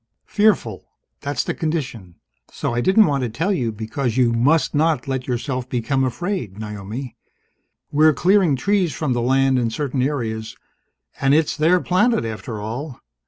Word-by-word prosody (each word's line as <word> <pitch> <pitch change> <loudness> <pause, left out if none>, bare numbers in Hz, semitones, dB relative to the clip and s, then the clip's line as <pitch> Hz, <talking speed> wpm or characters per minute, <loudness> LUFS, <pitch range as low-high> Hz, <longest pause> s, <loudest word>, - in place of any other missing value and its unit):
"Fearful. 205 - +1 0.3
That's 140 0 -2
the - - -2
condition. 130 - -4 0.4
So - - -3
I 120 - 0
didn't 205 - +5
want 140 -4 0
to 125 - -1
tell 165 - -1
you 120 -10 -1
because 115 +3 -3
you 120 -2 +3
must 135 +6 +2
not 155 -3 +1
let 130 -1 -3
yourself 125 0 -3
become 135 +2 0
afraid, 130 - -3
Naomi. 105 +4 -6 0.8
We're 155 +2 +5
clearing 185 -3 +3
trees 185 +3 0
from 150 -5 -1
the 120 - -1
land, 135 +1 +2
in 120 -2 0
certain 135 +2 -2
areas. 115 -5 -2 0.6
And 140 +1 +3
it's 160 -1 +2
their 165 +4 +3
planet, 200 - +2
after 110 0 -5
all. 120 +6 -6
135 Hz, 160 wpm, -21 LUFS, 115-155 Hz, 0.8 s, didn't